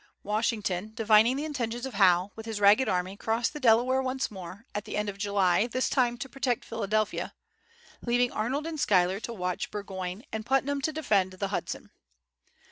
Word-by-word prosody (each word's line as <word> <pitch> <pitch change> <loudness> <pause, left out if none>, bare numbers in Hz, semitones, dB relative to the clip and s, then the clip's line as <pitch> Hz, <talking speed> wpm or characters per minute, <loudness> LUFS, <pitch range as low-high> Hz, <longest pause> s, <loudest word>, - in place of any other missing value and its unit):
Washington, 210 -2 -1
divining 225 +2 +5
the 290 +3 -3
intentions 245 -5 -3
of 265 - -6
Howe, 185 -1 +4
with 225 0 -9
his 220 -2 -3
ragged 205 +6 +5
army 185 +1 -1
crossed 225 +4 -1
the 300 - -6
Delaware 255 +1 +4
once 260 -1 -2
more, 190 +2 -9
at 205 0 -4
the - - -4
end 210 0 -1
of 200 0 -8
July, 200 0 +2
this 255 +2 -1
time 245 -3 +2
to 245 - -5
protect 255 -2 -2
Philadelphia, 215 -1 -1 0.7
leaving 245 0 +1
Arnold 260 +8 -2
and 325 -2 -4
Schuyler 185 -4 +3
to 230 - -6
watch 180 -5 -3
Burgoyne, 190 -1 -5
and 220 0 -3
Putnam 270 +3 +1
to 315 - 0
defend 205 -12 +1
the 195 +1 -3
Hudson. 200 - -4
220 Hz, 180 wpm, -28 LUFS, 200-250 Hz, 0.7 s, divining